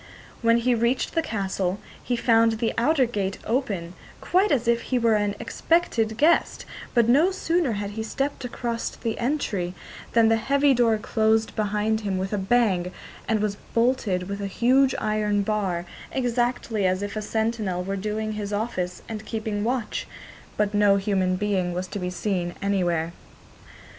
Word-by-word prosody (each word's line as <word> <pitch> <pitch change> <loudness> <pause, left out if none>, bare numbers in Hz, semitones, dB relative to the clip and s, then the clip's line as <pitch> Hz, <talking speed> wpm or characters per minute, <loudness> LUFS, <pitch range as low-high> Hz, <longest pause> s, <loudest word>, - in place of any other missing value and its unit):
When 230 0 +4
he 245 +1 +2
reached 235 +2 0
the 330 - +2
castle 195 - -2 0.2
he 245 - -1
found 230 -1 +4
the 225 +1 -1
outer 270 +3 +3
gate 200 -5 -2
open, 200 -9 -1 0.3
quite 385 +3 +2
as 245 -4 +1
if 235 0 +3
he 255 - -1
were 230 -2 +3
an 205 -1 +1
expected 230 -4 0
guest, 315 +6 +2 0.3
but 235 -2 +4
no 290 +9 +5
sooner 340 -7 0
had 205 -1 -3
he 220 +2 -4
stepped 270 +6 -3
across 235 -1 -3
the 225 -1 -4
entry 215 -9 -1 0.4
than 230 -1 +5
the 225 0 +4
heavy 280 +4 +3
door 235 -3 +3
closed 220 0 +1
behind 215 +1 0
him 200 -3 -2
with 190 +2 -3
a 205 - 0
bang, 190 -4 +2 0.4
and 220 -2 +1
was 205 -1 -1 0.2
bolted 230 -7 +1
with 200 0 -4
a 200 - -2
huge 255 +6 +3
iron 210 -1 0
bar, 195 -5 -1 0.3
exactly 240 -4 0
as 185 +2 0
if 205 +1 -4
a 215 - -2
sentinel 220 -4 -1
were 195 +2 -3
doing 215 +2 -2
his 210 -1 -4
office 205 -4 -3
and 215 -1 -6
keeping 215 -2 -2
watch, 240 -1 -2 0.5
but 210 0 +1
no 205 -1 +5
human 195 -2 +1
being 185 -3 0
was 180 +1 -2
to 200 - -6
be 180 -1 -2
seen 180 -1 -2
anywhere. 175 -5 0
215 Hz, 170 wpm, -25 LUFS, 200-235 Hz, 0.5 s, no